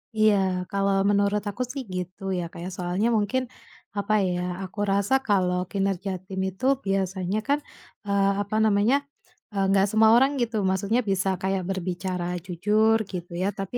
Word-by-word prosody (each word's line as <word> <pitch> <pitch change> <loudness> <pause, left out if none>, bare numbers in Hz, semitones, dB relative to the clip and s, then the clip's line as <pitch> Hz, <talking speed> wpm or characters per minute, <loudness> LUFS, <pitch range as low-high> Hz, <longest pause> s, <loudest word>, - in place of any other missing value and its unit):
Iya, 215 -1 +5 0.4
kalau 200 0 +1
menurut 205 0 +2
aku 205 +5 -3
sih 275 0 -5
gitu 180 +2 -5 0.2
ya, 175 - -1
kayak 175 +2 -6
soalnya 180 +5 0
mungkin 215 +5 0 0.5
apa 200 +1 0 0.2
ya, 180 0 -1 0.2
aku 190 +2 -8
rasa 200 +4 +1
kalau 180 -3 +1
kinerja 195 -1 -1
tim 190 -1 -5
itu 190 +6 -5 0.2
biasanya 190 0 -1
kan, 285 +1 +2 0.5
eee, 200 0 +3
apa 205 +1 -4
namanya 215 +4 +3 0.6
nggak, 195 -1 +2
eee, 200 - 0
semua 220 0 +5
orang 265 +3 +5
gitu 235 -2 -1
maksudnya 200 +6 +1
bisa 195 0 +1
kayak 190 0 0
berbicara 185 -1 -3 0.2
jujur 210 +5 +2
gitu 175 -2 -6
ya 190 - +1
tapi, 195 +5 -3
195 Hz, 155 wpm, -25 LUFS, 185-210 Hz, 0.6 s, Iya